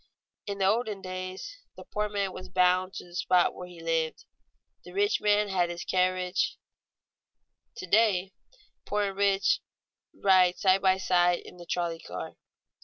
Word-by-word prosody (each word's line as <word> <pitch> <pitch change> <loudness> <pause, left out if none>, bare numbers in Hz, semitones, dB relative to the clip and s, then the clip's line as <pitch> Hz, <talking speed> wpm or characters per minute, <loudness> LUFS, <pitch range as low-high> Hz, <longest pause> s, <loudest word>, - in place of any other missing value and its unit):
_ - - -36 0.5
In 200 - -4
the 195 - +1
olden 215 0 +1
days 185 - -6 0.2
the - - -10
poor 210 0 -3
man 200 -2 -2
was 185 0 -9
bound 185 +1 +2
to - - -7
the 175 - -17
spot 180 0 +2
where 180 - -8
he 175 -2 -12
lived, 165 -1 -1 0.6
the - - -12
rich 410 +1 +1
man 210 0 +3
had 180 -3 +1
his 175 0 -5
carriage; 185 0 0 1.2
to - - -7
day 195 -2 +2 0.5
poor 210 0 -1
and 195 -1 -2
rich 200 -1 +2 0.5
ride 185 -2 +4
side 190 -1 +3
by 190 -1 +4
side 175 -2 +2
in - - -12
the 175 -1 -12
trolley 170 -1 -2
car. - - -7
185 Hz, 165 wpm, -28 LUFS, 180-200 Hz, 1.2 s, ride